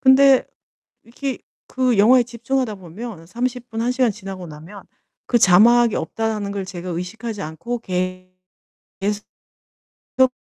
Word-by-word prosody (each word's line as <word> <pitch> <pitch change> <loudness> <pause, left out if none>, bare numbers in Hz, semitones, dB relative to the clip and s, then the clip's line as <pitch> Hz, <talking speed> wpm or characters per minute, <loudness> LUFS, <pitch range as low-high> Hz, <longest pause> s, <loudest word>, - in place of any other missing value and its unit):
근데 265 0 +6 0.6
이렇게 255 +3 -4 0.3
그 255 -3 +1
영화에 240 +5 +6
집중하다 240 0 -2
보면 190 0 -9
30 245 +5 -3
분, 225 0 -3
1 240 +2 +1
시간 250 -2 +2
지나고 195 -3 -8
나면 165 +6 -11 0.4
그 240 - +3
'자막이 230 +4 +6
없다.'라는 215 -3 -2
걸 200 -1 -3
제가 180 -1 -7
의식하지 200 +5 -5
않고 165 +11 -4
계 185 -2 -3 0.7
계스 205 +1 -1 1.0
속 260 -1 +6
220 Hz, 250 characters per minute, -21 LUFS, 185-245 Hz, 1.0 s, 근데